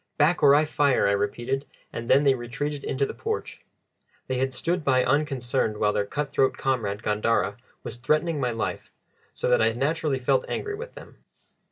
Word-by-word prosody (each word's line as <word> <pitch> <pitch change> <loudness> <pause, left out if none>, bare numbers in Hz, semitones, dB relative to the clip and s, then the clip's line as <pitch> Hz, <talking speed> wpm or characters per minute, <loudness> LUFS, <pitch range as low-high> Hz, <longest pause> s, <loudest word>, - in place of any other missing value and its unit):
"Back, 155 +4 +3
or 140 -1 +7
I 150 +1 +4
fire!" 145 -3 +2
I - - +3
repeated, 120 +7 -1 0.3
and 115 0 -6
then 135 +2 +5
they 140 -2 +5
retreated 135 +4 -4
into 140 +1 0
the - - -6
porch. 440 0 -5 0.6
They 130 -1 -2
had 130 0 0
stood 170 +5 -1
by 130 -3 +3
unconcerned 130 -6 0
while 105 0 +1
their 100 - -1
cut 145 +4 -3
throat 135 -1 +2
comrade 110 -6 -1
Gandara 105 -1 0 0.3
was - - -6
threatening 155 +5 0
my 125 -2 0
life, 115 -1 -4 0.4
so - - -2
that - - +4
I 115 0 +3
naturally 145 +3 0
felt 130 +1 +1
angry 420 - -3
with 470 +4 -8
them. - - -13
135 Hz, 185 wpm, -25 LUFS, 120-150 Hz, 0.6 s, or